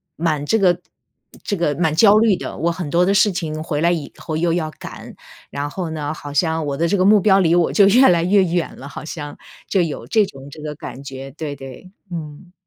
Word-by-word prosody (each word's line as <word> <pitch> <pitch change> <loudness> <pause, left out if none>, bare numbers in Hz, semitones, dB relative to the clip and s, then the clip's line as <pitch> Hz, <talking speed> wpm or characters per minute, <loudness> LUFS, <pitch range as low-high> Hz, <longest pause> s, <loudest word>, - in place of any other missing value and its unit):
蛮 155 -3 -1
这 225 - +2
个 180 -4 +3 0.6
这 205 -3 -2
个 160 -4 0
蛮 160 -1 +1
焦 205 +5 +6
虑 215 -2 +4
的。 - - -6
我 170 +2 0
很 170 -2 -5
多 175 +3 +3
的 195 - +2
事 210 +1 +4
情 155 -3 -4
回 155 -2 -2
来 170 - +3
以 165 -4 -3
后 155 -2 -4
又 170 0 +1
要 160 -3 -2
赶， - - -10 0.4
然 145 +1 -4
后 175 +2 -4
呢， 155 -1 -4
好 145 -2 -9
像 160 +1 +1
我 140 -1 -3
的 170 +2 +1
这 205 - +1
个 185 - +2
目 205 +2 +6
标 195 0 +4
离 170 -3 +3
我 175 -2 +2
就 200 - +6
越 250 +6 +6
来 170 -2 +3
越 195 +3 +4
远 175 -1 -1
了， 140 - -9
好 - - -8
像。 150 -2 -7 0.3
就 190 - +2
有 160 -4 -4
这 215 -2 +3
种 135 -5 -12
这 150 - -11
个 150 -1 -5
感 130 -1 -9
觉。 135 0 -8
对 150 0 -5
对， 135 +7 -11 0.2
嗯。 165 0 -8
165 Hz, 255 characters per minute, -20 LUFS, 150-185 Hz, 0.6 s, 焦